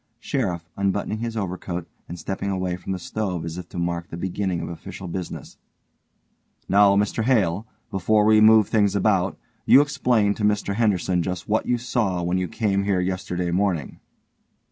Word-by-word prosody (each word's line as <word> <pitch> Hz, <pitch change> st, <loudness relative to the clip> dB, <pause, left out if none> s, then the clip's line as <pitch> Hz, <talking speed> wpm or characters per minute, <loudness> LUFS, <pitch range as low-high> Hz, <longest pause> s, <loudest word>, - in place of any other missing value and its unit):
SHERIFF: 90 Hz, -, -2 dB
(unbuttoning 100 Hz, +2 st, -1 dB
his 115 Hz, 0 st, -4 dB
overcoat 90 Hz, -3 st, -4 dB, 0.2 s
and 85 Hz, -, -6 dB
stepping 95 Hz, +3 st, -4 dB
away 95 Hz, -2 st, -1 dB
from 90 Hz, -, -7 dB
the 95 Hz, -, -1 dB
stove 90 Hz, -3 st, -3 dB
as 85 Hz, +2 st, -5 dB
if 90 Hz, -, -9 dB
to -, -, -9 dB
mark 85 Hz, 0 st, -2 dB
the 85 Hz, -, -7 dB
beginning 95 Hz, 0 st, -2 dB
of -, -, -4 dB
official 85 Hz, +2 st, -8 dB
business) 90 Hz, +1 st, -6 dB, 1.1 s
Now, 100 Hz, 0 st, +5 dB
Mr 105 Hz, +3 st, 0 dB
Hale, 105 Hz, -5 st, +1 dB, 0.2 s
before 105 Hz, +3 st, +2 dB
we 110 Hz, 0 st, +5 dB
move 110 Hz, -1 st, +7 dB
things 105 Hz, -2 st, +2 dB
about, 100 Hz, -2 st, +1 dB, 0.3 s
you -, -, +7 dB
explain 125 Hz, -8 st, +2 dB
to 105 Hz, -, -6 dB
Mr 105 Hz, -1 st, +1 dB
Henderson 95 Hz, -5 st, +1 dB
just 90 Hz, +1 st, -4 dB
what 110 Hz, +1 st, 0 dB
you 125 Hz, -, +2 dB
saw 110 Hz, -7 st, -1 dB
when 90 Hz, +2 st, 0 dB
you 90 Hz, -, -1 dB
came 100 Hz, +1 st, 0 dB
here 100 Hz, -2 st, +1 dB
yesterday 90 Hz, -1 st, -2 dB
morning. 90 Hz, -5 st, -1 dB
95 Hz, 170 wpm, -23 LUFS, 90-105 Hz, 1.1 s, move